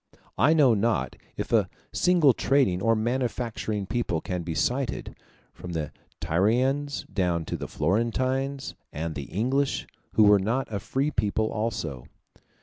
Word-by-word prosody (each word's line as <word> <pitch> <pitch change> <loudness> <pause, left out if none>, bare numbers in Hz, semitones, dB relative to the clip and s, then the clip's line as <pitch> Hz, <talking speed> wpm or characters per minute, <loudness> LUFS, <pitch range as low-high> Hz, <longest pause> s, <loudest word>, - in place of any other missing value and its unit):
I 155 +3 +5
know 140 -6 +6
not 110 +2 0 0.2
if - - -4
a - - +3 0.2
single 175 -7 +4
trading 130 -12 +2
or 115 +2 +3
manufacturing 115 -3 -2
people 105 -5 -1
can 90 +2 -3
be 85 -1 -4
cited, 125 +6 -1 0.4
from 90 -1 -8
the 80 -3 -3 0.3
Tyrians 130 - +1
down 90 -4 0
to - - -3
the - - -5
Florentines 130 - -1 0.2
and 80 +2 -3
the 70 -2 -5
English, 130 - 0 0.3
who 110 - +5
were 105 -1 +7
not 115 +8 0
a 100 - -1
free 140 +8 -1
people 110 -2 0
also. 85 - -3
110 Hz, 145 wpm, -26 LUFS, 90-130 Hz, 0.4 s, were